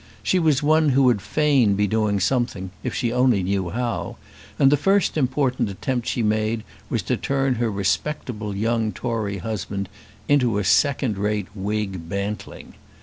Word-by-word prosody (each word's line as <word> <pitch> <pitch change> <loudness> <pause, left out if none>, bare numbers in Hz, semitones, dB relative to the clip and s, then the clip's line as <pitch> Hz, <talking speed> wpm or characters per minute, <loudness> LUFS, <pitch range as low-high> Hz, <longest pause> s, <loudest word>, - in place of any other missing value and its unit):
She 185 - +2
was 155 -4 +2
one 155 +1 +4
who 135 0 +3
would 120 -6 +3
fain 135 -3 +2
be 105 +1 +2
doing 105 -1 +1
something 95 -3 -1
if - - -3
she 120 -3 -1
only 125 -6 +3
knew 95 -1 -1
how, 120 +4 -3 0.4
and 135 -1 +5
the - - +6
first 195 +7 +2
important 130 -5 0
attempt 120 +5 -3
she 120 - 0
made 110 +1 0 0.3
was - - -1
to - - 0
turn 135 -1 0
her 120 - +1
respectable 105 +1 -2
young 110 +1 0
Tory 110 -5 -3
husband 100 -1 -4 0.4
into 125 -7 +3
a 105 - 0
second 125 0 +2
rate 105 -1 -1
Whig 100 -4 -3
bantling. 100 +2 -5
110 Hz, 160 wpm, -23 LUFS, 100-130 Hz, 0.4 s, the